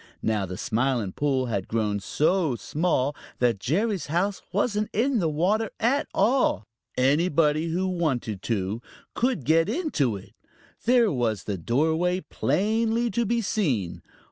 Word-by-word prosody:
Now 105 -3 0
the 90 0 -6
Smiling 120 -3 0
Pool 135 +2 0
had 100 -6 -2
grown 105 -2 0
so 155 - +1
small 145 0 0 0.2
that 120 -4 +1
Jerry's 190 - 0
house 180 +6 0
wasn't 210 +1 0
in 245 +3 +2
the 165 -4 +1
water 195 +8 +1
at 255 +6 +1
all. 210 - +2 0.3
Anybody 150 +3 +2
who 180 +3 -1
wanted 135 - -1
to 105 0 -2 0.3
could 245 - 0
get 165 +4 +3
into 220 - 0
it. 95 - -14 0.5
There 240 -2 +4
was 115 - -1
the 100 -3 -4
doorway 160 - +1
plainly 220 - 0
to 235 -1 0
be 235 +2 +1
seen. 130 - -1
160 Hz, 140 wpm, -26 LUFS, -, 0.5 s, There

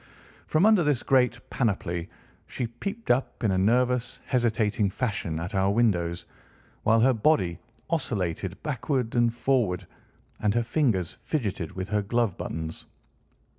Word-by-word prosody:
From 155 +5 +3
under 215 -5 +5
this 145 -5 +1
great 125 -2 +2
panoply 90 -7 -1 0.4
she 125 - -3
peeped 200 - -4
up 125 0 0
in 105 - +3
a 95 - +1
nervous, 125 +4 +1
hesitating 110 -4 +1
fashion 95 -8 -2
at 85 +5 -5
our 95 0 +2
windows, 90 -6 +1 0.6
while 115 +1 +4
her 130 +2 +5
body 110 - +2 0.3
oscillated 95 - -2
backward 130 -4 -1
and 120 -1 +3
forward, 115 -7 0 0.5
and 105 0 +1
her 120 - +2
fingers 115 - 0
fidgeted 100 - -2
with 95 +1 -5
her 105 -1 +1
glove 115 -1 0
buttons. 80 0 -5
115 Hz, 135 wpm, -27 LUFS, 95-125 Hz, 0.6 s, under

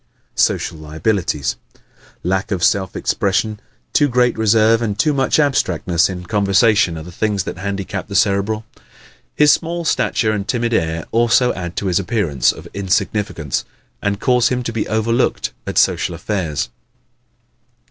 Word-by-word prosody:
Social 80 - 0
Liabilities 80 - -1 0.2
¶ - - -26 0.4
Lack 95 +2 -1
of 95 -4 -2
self 95 0 +1
expression, 105 +2 0 0.3
too 145 - +4
great 125 -2 +2
reserve 110 +1 +3
and 105 -3 -2
too 150 +7 +2
much 135 -2 +1
abstractness 90 - +1
in 90 -2 -6
conversation 100 -3 +3
are 80 - -7
the 90 - -10
things 100 +1 -1
that 90 - -6
handicap 100 0 -4
the 100 - -7
Cerebral. 105 +2 +1 0.7
His 150 -1 +6
small 170 0 -1
stature 110 -7 +1
and 105 -1 -3
timid 120 -1 0
air 80 -5 0
also 120 +2 +3
add 90 -1 -6
to - - -3
his 90 -1 +2
appearance 90 - +1
of - - -11
insignificance 100 - -1 0.4
and 100 0 -1
cause 125 -1 +3
him 125 -1 -1
to 115 - -4
be 115 - -2
overlooked 115 +3 0 0.2
at - - -3
social - - +2
affairs. 80 - -2
105 Hz, 150 wpm, -18 LUFS, 90-115 Hz, 0.7 s, His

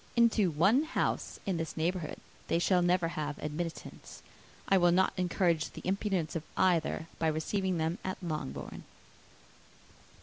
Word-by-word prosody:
Into 230 -5 +4
one 195 - +4
house 315 - -1
in 190 -3 0
this 165 0 -4
neighbourhood 165 -1 -1 0.3
they - - +2
shall 180 +1 +3
never 175 -1 +2
have 150 -2 -3
admittance. 160 +2 -6 0.4
I 195 - +5
will 175 -1 +5
not 190 +2 +3
encourage 175 -3 +1
the - - -10
imprudence 190 -5 -1
of 165 - -1 0.2
either, 175 -3 +2
by 160 - +2
receiving 180 +4 0
them 160 +2 -1
at 185 - -3
Longbourn." 150 - -4
175 Hz, 140 wpm, -31 LUFS, 160-190 Hz, 0.4 s, I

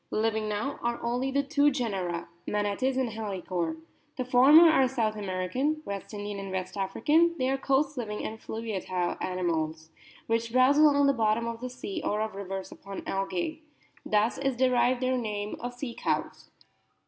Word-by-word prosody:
Living 220 0 0
now 220 +7 -2
are 235 0 -1
only 245 +3 0
the 280 +1 +1
two 290 0 +3
genera, 195 - -2 0.2
Manatus 210 +6 0
and 260 -2 +1
Halicore. 185 -6 -3 0.4
The 255 - -2
former 270 +7 +8
are 270 -5 +5
South 230 -4 -1
American, 210 +10 -2
West 200 -1 -5
Indian, 205 -1 -5
and 195 -1 -6
West 185 -1 -4
African; 295 - +2
they 255 - 0
are 270 - +1
coast 275 +1 +1
living 210 -3 -4
and 220 +1 -5
fluyiatile 190 -6 -3
animals, 160 -3 -2 0.3
which 230 0 -1
browse 255 +4 +5
along" 285 -2 +6
the 275 - +4
bottom 225 -1 +1
of 230 0 -5
the 255 - -4
sea 250 -5 -5
or 210 - 0
of 220 -1 -2
rivers 195 -1 -6
O - - -15
upon 195 0 -8
algae. 195 - -2 0.4
Thus 215 +2 +1
is 270 -2 0
derived 250 0 +2
their 255 0 +1
name 210 -2 -3
of 245 0 -5
Sea 245 -2 -5
cows. - - -2
225 Hz, 170 wpm, -28 LUFS, 200-260 Hz, 0.4 s, former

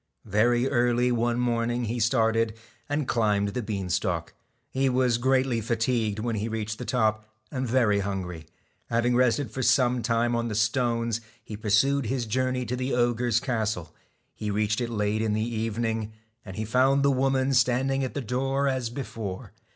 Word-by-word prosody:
Very 120 +4 +2
early 125 -1 +2
one 120 0 +1
morning 120 0 0
he 115 +2 -2
started, 115 -1 +2 0.3
and 145 -2 -1
climbed 105 -3 +1
the 125 +5 -3
bean 100 -4 -3
stalk. 90 - -1 0.4
He 135 0 +1
was 125 -2 +2
greatly 130 -2 +2
fatigued 115 -1 0
when 115 +1 -2
he 105 +2 -2
reached 110 -1 -4
the 125 - -5
top, 110 -3 0 0.2
and 130 -1 -2
very 115 -4 +3
hungry. 90 -5 -4 0.4
Having 120 +1 +2
rested 125 0 +2
for 130 - -4
some 125 -1 +3
time 120 +1 +1
on 115 0 -1
the 110 - -3
stones, 115 +1 0 0.2
he 110 - -7
pursued 115 +6 +2
his 125 0 -1
journey 130 +2 -1
to 120 +3 -2
the 130 +1 -1
ogre's 120 -1 +2
castle. 110 -9 -2 0.4
He 105 - -5
reached 105 +2 0
it 120 - -2
late 105 -1 0
in 110 -1 0
the 110 +2 -1
evening; 110 0 -2 0.3
and 95 -2 -9
he 110 - -3
found 130 +5 +3
the 140 - +4
woman 135 0 +1
standing 130 +2 +2
at 130 - -4
the 145 - -1
door 135 +4 0
as 130 -3 -1
before. 115 -7 -6
120 Hz, 175 wpm, -26 LUFS, 110-125 Hz, 0.4 s, the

